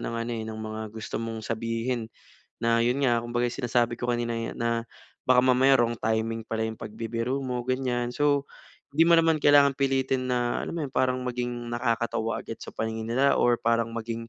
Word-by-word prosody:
ng 115 - -4
ano, 115 +1 -3
eh, 110 -1 -3
ng 110 - -6
mga 110 0 -5 0.2
gusto 110 - -4
mong 115 -1 -5
sabihin. 115 +1 -2 0.5
Na 115 0 +3
yun 125 +3 +1
nga 120 -4 +2
kumbaga 120 +1 0
sinasabi 120 -2 0
ko 120 0 -1
kanina, 120 -1 -1
eh, 115 0 -3
na 115 0 -1 0.4
baka 125 -1 +5
mamaya 130 +1 +5
wrong 120 -1 +1
timing 110 +1 -1
pala 110 0 -2
yung 110 - -6
pagbibiro 115 +5 -3
mo, 125 -2 -3
ganyan. 125 -1 -1
So 145 0 +2 0.5
di 165 +4 +4
mo 170 - +7
naman 165 -1 +3
kailangan 145 -1 +6
pilitin 135 -1 0
na 120 -1 0
alam - - -4
mo 160 - -2
yun 130 - -7
parang 130 0 +2
maging 120 -1 -3
nakakatawa 115 -1 -1
agad 115 - -7
sa - - -9
paningin 110 0 -3
nila 135 +4 +3
or 120 0 +4
parang 115 0 +1
maging 115 0 -5
120 Hz, 195 wpm, -27 LUFS, 115-130 Hz, 0.5 s, mo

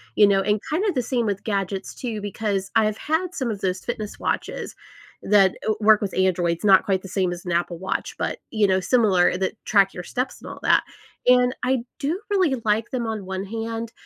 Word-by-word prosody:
you 205 - +6
know, 195 -1 +3
and 210 +1 +1
kinda 385 +6 +1
the 250 - 0
same 240 0 -1
with 200 -2 -2
gadgets, 195 -2 -3
too, 225 -5 -4
because 200 -1 -2
I 225 -1 +5
have 215 0 -1
had 330 +4 -1
some 260 -7 -2
of 200 - -6
those 185 0 -1
fitness 215 -3 -5
watches - - -3 0.5
that 195 -2 +4
w 215 -1 0
work 215 0 +6
with 200 - -3
Androids, 175 -2 +1
not 195 -2 +6
quite 190 -2 +1
the - - -7
same 185 -2 0
as 175 +1 -9
an 175 - -3
Apple 170 0 -1
Watch, 190 - -3
but, - - -2
you 215 -3 +3
know, 190 0 +2
similar 190 -4 +3
that 190 +3 -1
track 195 -2 +4
your 180 - -6
steps, 250 +7 -3
and - - -9
all - - -10
that, - - +4 0.4
and 250 0 +5
I 255 0 +2 0.2
do, 310 +7 -1
really, 365 -9 +3
like 215 +2 +1
them 240 -3 -2
on 215 -3 -4
one 190 +1 -4
hand, 225 +2 -4
210 Hz, 220 wpm, -23 LUFS, 190-235 Hz, 0.5 s, you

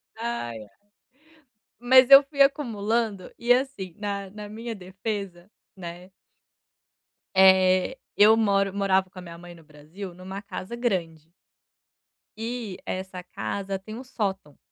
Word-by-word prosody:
Ai, 225 - -4
ai. 105 - -11 1.1
Mas 255 +1 +6
eu 275 +1 +10
fui 280 0 -2
acumulando, 225 -7 +1
e, 240 +1 +4
assim, 250 -9 -2
na 200 -2 -4
na 210 0 -9
minha 230 +2 -6
defesa, 190 -1 -6 0.3
né 175 0 -9 1.2
eh, 190 +4 +5 0.2
eu 215 +2 +7
moro 200 -3 +2
morava 190 -1 +1
com 185 0 -12
a - - -8
minha 170 -1 -10
mãe 175 0 -12
no 165 - -17
Brasil 155 +5 -10
numa 190 +2 -8
casa 200 +2 -7
grande 170 -9 -3 1.1
e 225 -3 -5
essa 185 -1 -5
casa 195 - -4
tem 215 +3 -9
um 255 - -8
sótão. 195 - -4
195 Hz, 130 wpm, -25 LUFS, 185-225 Hz, 1.2 s, eu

